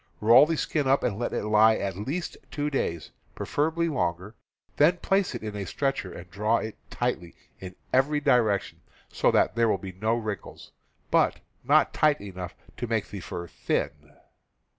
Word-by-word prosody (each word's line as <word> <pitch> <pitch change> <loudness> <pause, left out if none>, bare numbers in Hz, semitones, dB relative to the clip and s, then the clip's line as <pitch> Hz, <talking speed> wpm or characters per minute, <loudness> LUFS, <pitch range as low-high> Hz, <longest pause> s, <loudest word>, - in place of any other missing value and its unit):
Roll 120 +7 +7
the 165 0 -1
skin 145 -2 -1
up 135 +1 +3
and 105 -2 -1
let 120 - -2
it - - -2
lie 110 +1 +5
at 100 -4 -3
least 140 - -4
two 150 0 -2
days 85 - -2
— - - -36
preferably 160 +3 0
longer; 90 - -2 0.4
then 165 +5 +5
place 195 +1 0
it - - -6
in 105 -1 -5
a 100 - -3
stretcher 135 -8 -2
and 85 0 -10
draw 105 +3 +1
it 110 - -5
tightly 85 0 -3 0.2
in 95 -1 -9 0.2
every 145 +3 +3
direction, 120 -8 +1 0.3
so - - +2
that - - +3
there 115 -1 +2
will 100 - +2
be 95 0 -8
no 110 +5 0
wrinkles, 110 -5 -6 0.4
but - - +3 0.2
not - - +4
tightly 145 -10 +2
enough 90 -2 -7 0.2
to 120 +1 -3
make 110 -2 -1
the 100 - -6
fur 85 0 -6
thin. 75 -3 -3
110 Hz, 180 wpm, -27 LUFS, 95-140 Hz, 0.4 s, Roll